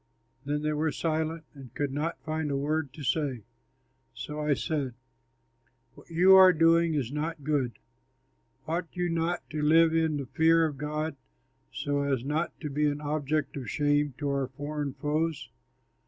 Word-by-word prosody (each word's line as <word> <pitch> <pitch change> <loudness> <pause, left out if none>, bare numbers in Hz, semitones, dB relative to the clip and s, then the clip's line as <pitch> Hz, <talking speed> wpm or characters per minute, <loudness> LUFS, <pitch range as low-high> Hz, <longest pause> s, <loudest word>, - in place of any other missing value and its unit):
Then 150 +1 -1
they 155 0 0
were 155 +1 0
silent 160 0 -2
and 135 -5 -12
could 145 -2 -1
not 155 +4 -2
find 155 -1 -2
a 140 - 0
word 150 0 -1
to 150 - -9
say. 135 -3 -1 0.7
So 150 +5 -6
I 150 -1 +1
said, 140 -7 -2 1.0
"What - - -17
you 180 +3 +6
are 190 -1 +9
doing 165 0 +4
is 130 -4 -1
not 150 +1 -3
good. 135 -5 -1 0.9
Ought 170 +2 -1
you 180 -1 -1
not 165 +1 -1
to 155 0 -2
live 160 +2 +5
in 160 -2 +1
the 140 - -4
fear 160 +5 +3
of 145 -4 -4
God, 150 0 -3 0.5
so 145 0 -1
as 135 -3 -1
not 155 +4 -2
to 150 - -4
be 150 +2 +1
an 145 0 -1
object 150 -1 -1
of 130 -6 -5
shame 145 0 +1
to 145 - -3
our 140 -1 0
foreign 145 +1 -4
foes? 150 -4 -2
150 Hz, 170 wpm, -28 LUFS, 140-160 Hz, 1.0 s, are